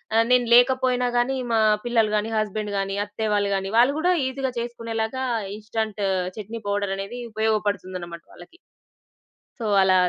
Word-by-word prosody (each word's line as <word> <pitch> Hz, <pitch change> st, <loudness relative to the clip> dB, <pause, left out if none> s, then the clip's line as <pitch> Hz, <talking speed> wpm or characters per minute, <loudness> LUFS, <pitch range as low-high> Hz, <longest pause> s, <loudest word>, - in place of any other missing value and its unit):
ఆహ్, 225 Hz, 0 st, +5 dB
నేను 250 Hz, -1 st, +4 dB
లేకపోయినా 250 Hz, 0 st, +3 dB
గానీ 255 Hz, +2 st, +1 dB, 0.2 s
మా 225 Hz, -, +4 dB, 0.3 s
పిల్లలు 230 Hz, -3 st, +2 dB
గానీ, 210 Hz, +2 st, -2 dB
హస్బెండ్ 215 Hz, -1 st, -2 dB
గానీ, 195 Hz, 0 st, -2 dB
అత్తయ్య 210 Hz, +1 st, -3 dB
వాళ్ళు 200 Hz, -1 st, +1 dB
గానీ, 195 Hz, 0 st, -3 dB
వాళ్ళు 250 Hz, +4 st, +5 dB
గూడా 360 Hz, +3 st, +3 dB
ఈజీగా 265 Hz, 0 st, -2 dB
చేసుకునేలాగా 230 Hz, +1 st, -3 dB, 0.3 s
ఇన్‌స్టాంట్ 215 Hz, -1 st, -4 dB, 0.4 s
చట్నీ 220 Hz, +2 st, -6 dB
పౌడర్ 200 Hz, -1 st, 0 dB
అనేది 200 Hz, +5 st, -6 dB
ఉపయోగపడుతుందనమాట 200 Hz, -6 st, -2 dB
వాళ్ళకి. 175 Hz, -, -15 dB, 1.0 s
సో, 230 Hz, -, -4 dB, 0.2 s
అలా 190 Hz, -1 st, +4 dB
220 Hz, 145 wpm, -24 LUFS, 205-240 Hz, 1.0 s, ఆహ్